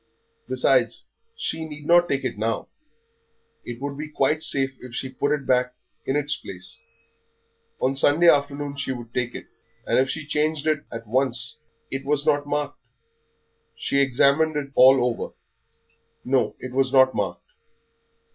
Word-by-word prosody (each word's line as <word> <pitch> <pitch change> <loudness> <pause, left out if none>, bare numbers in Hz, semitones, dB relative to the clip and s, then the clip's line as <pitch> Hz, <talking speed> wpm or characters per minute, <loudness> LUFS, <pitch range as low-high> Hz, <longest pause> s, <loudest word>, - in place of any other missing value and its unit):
Besides, - - +2 0.3
she 160 - -3
need 150 -1 -9
not 175 +2 +5
take 135 -1 0
it 130 - -2
now. 110 +2 -2 0.9
It 120 -1 -7
would 140 +1 -5
be 155 - -4
quite 150 +1 +1
safe 135 -4 +1
if 125 -2 -10
she 130 - -3
put 145 +2 -1
it 145 -2 -1
back 125 0 +1 0.3
in 135 - 0
its 145 0 0
place; 90 -1 -7 1.0
on 135 +1 +1
Sunday 145 +5 +4
afternoon 145 -1 +2
she 140 -1 -2
would 120 -2 -9
take 125 -1 -2
it, - - -7 0.4
and - - +2
if 135 +1 +2
she 155 +1 -3
changed 150 0 -1
it 155 -2 0
at 115 0 -7
once 125 +2 +1 0.3
It 135 0 -3
was 145 +1 0
not 145 0 +2
marked. 145 0 -2 1.0
She 140 - 0
examined 140 +4 +3
it 140 -2 -3
all 130 -1 +6
over. 120 -2 -3 0.9
No, 125 -5 +1
it 130 - -8
was 130 0 +1
not 130 -1 +5
marked. 90 -4 -3
135 Hz, 155 wpm, -24 LUFS, 125-150 Hz, 1.0 s, all